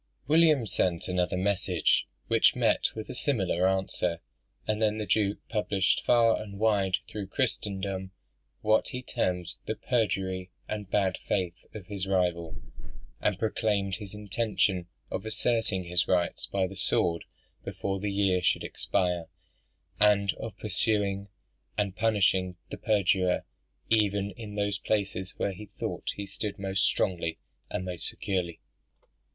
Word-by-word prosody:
William 155 -4 +5
sent 90 -4 0
another 90 0 0
message, 95 -3 +2 0.2
which - - +5
met - - +3
with 110 -1 -5
a - - -6
similar 95 - +1
answer; 95 -3 0 0.5
and 110 0 0
then 110 -1 +2
the 105 - -2
Duke 100 +1 +2
published 105 -3 +1
far 115 -2 +4
and 100 -2 -8
wide 100 -3 +3
through 105 -3 -5
Christendom 95 -5 -2 0.5
what 110 +1 +3
he 125 0 -5
termed 90 -6 -1
the 110 - -1
perjury 95 -6 0 0.2
and 105 -3 -4
bad 95 -2 +1
faith 90 -2 -1
of 105 -4 -7
his 100 -1 -3
rival; 90 -3 0 0.6
and 105 - +1
proclaimed 105 -3 0
his 105 -2 -8
intention 100 -3 0 0.2
of - - -2
asserting 110 -3 0
his 90 +1 +1
rights 90 -2 +1
by 95 -1 +1
the 95 +1 -6
sword 85 -2 +1 0.4
before 95 0 -3
the 100 +1 -1
year 100 -2 +2
should - - +2
expire, 90 -2 0 0.7
and 100 -2 +4
of - - -6
pursuing 100 -2 0 0.5
and 100 -3 0
punishing 95 -4 +2 0.2
the - - -4
perjurer 95 -4 +2 0.5
even 100 -2 +3
in 105 +1 -8
those 100 -1 0
places 95 -3 -1
where 100 - 0
he 105 +3 -9
thought - - -4
he 100 - -4
stood 100 +1 -4
most 95 -1 0
strongly 85 -3 0 0.3
and 95 - -3
most 90 -2 -1
securely. 90 -4 -2
100 Hz, 140 wpm, -29 LUFS, 95-105 Hz, 0.7 s, William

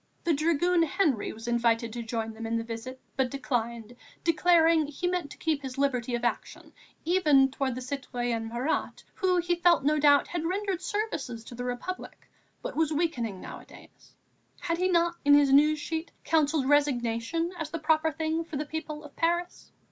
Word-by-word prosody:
The 340 - +2
dragoon 335 +3 +2
Henry 310 - +1
was 225 +2 -10
invited 230 -1 +1
to 240 - -4
join 225 -1 -3
them 225 +1 -6
in 230 +1 0
the 230 - -2
visit, 230 +3 -7 0.2
but 265 -2 +1
declined, 235 -3 -3 0.3
declaring 330 -1 +4
he 295 +5 -5
meant 355 -4 -1
to - - -11
keep 310 -3 -1
his 265 -2 -7
liberty 255 -3 0
of 240 - -4
action, 240 - -3 0.3
even 300 -7 +4
towards 265 -2 -2
the 255 - -5
citoyen 245 -4 -3
Marat, 245 +7 -2
who, 370 -2 +1
he 350 0 +1
felt 345 -3 +3
no 300 +2 +2
doubt, 285 -1 +5
had 345 -2 -3
rendered 380 +1 -2
services 340 - -3
to 240 - -11
the 245 +1 -5
Republic, 250 +10 -6 0.4
but - - -5
was 315 -1 +1
weakening 255 - -1
nowadays; - - -13 0.4
had 335 0 -2
he 365 - +2
not, 340 -1 +2
in 285 -1 +7
his 285 -2 +4
news 300 +2 +5
sheet, 320 +2 -4
counselled 310 -3 +2
resignation 285 +2 +1
as 315 -1 -3
the 330 - -4
proper 315 0 +2
thing 320 +2 -1
for 325 -3 -6
the 300 - -2
people 305 0 -6
of 295 - -13
Paris? 345 +1 -1
290 Hz, 180 wpm, -28 LUFS, 245-330 Hz, 0.4 s, in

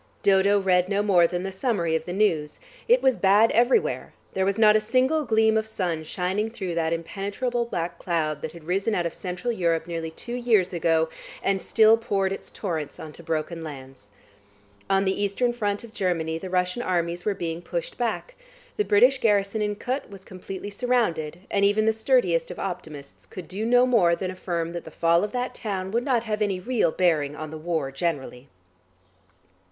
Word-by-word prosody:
Dodo 200 +1 +4
read 185 -1 +2
no 200 0 +1
more 180 -5 +5
than 175 +1 -3
the 195 - -3
summary 190 -6 0
of 160 0 -2
the 175 - -5
news. 175 -7 0 0.3
It - - +4
was 260 -2 +3
bad 205 +3 +5
everywhere; 245 - +2 0.2
there 190 0 0
was 200 +1 0
not 215 -1 +6
a 215 - +4
single 260 +7 +1
gleam 220 -1 +3
of 220 0 -1
sun 175 -7 -2
shining 190 +6 -1
through 195 -6 -5
that 165 -1 0
impenetrable 205 +8 -2
black 170 -6 -4
cloud 155 -4 -1
that 160 - -5
had 170 -2 -12
risen 195 +6 0
out 175 - 0
of 170 - -2
Central 180 +6 -3
Europe 165 -5 0
nearly 165 -1 -4
two 235 +9 -8
years 225 -7 +2
ago, 165 -1 +2 0.4
and 195 -1 +1
still 220 0 +5
poured 195 -4 -1
its - - -7
torrents 160 -7 -4
on 155 -1 -8
to - - -10
broken 165 0 -3
lands. 135 -8 -10 0.8
On 195 0 +3
the 190 +1 0
Eastern 225 +5 +1
front 205 -3 -2
of 230 -2 -12
Germany 165 -5 -1
the 185 - -7
Russian 180 +5 0
armies 175 -4 -1
were 205 - 0
being 165 -1 -4
pushed - - -4
back; - - -3 0.4
the 420 - +2
British 250 - +4
garrison 205 -1 +1
in 210 0 -1
Kut 255 +6 -3
was 195 -1 -12
completely 190 +2 -7
surrounded, 190 -9 -1
and 200 - +1
even 205 +2 +3
the 220 - +3
sturdiest 220 -8 +2
of 180 - -7
optimists 155 -7 -7
could 180 -4 -9
do 210 +4 -3
no 245 +1 +5
more 200 -9 +4
than 185 +1 -4
affirm 170 -2 -3
that 170 - -5
the - - -10
fall 170 +2 +2
of 210 - -2
that 250 0 -2
town 190 -5 -4
would 235 +3 0
not 245 -3 +1
have 215 -2 -3
any 200 -3 0
real 215 -4 +1
bearing 155 -6 +1
on 155 0 -7
the - - -6
war 160 -4 -2
generally. 135 -4 -3
190 Hz, 195 wpm, -25 LUFS, 170-220 Hz, 0.8 s, not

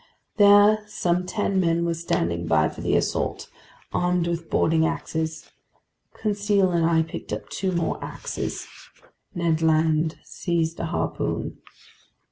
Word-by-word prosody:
There 205 +1 +6
some 180 -3 -1
ten 200 -1 0
men 170 -1 +2
were 170 - 0
standing 85 - -1
by 80 -2 +3
for - - -10
the - - +1
assault, - - -1 0.5
armed 180 -1 +1
with 170 -1 -3
boarding 160 0 +2
axes. 160 -1 -3 0.6
Conseil 205 -3 +1
and 170 -1 +2
I 165 -1 +3
picked 160 - -8
up 105 -1 -5
two 185 - -2
more 170 -2 -1
axes. - - -5 0.7
Ned 165 -2 +1
Land 160 0 +2
seized 165 -2 -2
a - - -2
harpoon. 165 - -3
170 Hz, 130 wpm, -24 LUFS, 160-185 Hz, 0.7 s, There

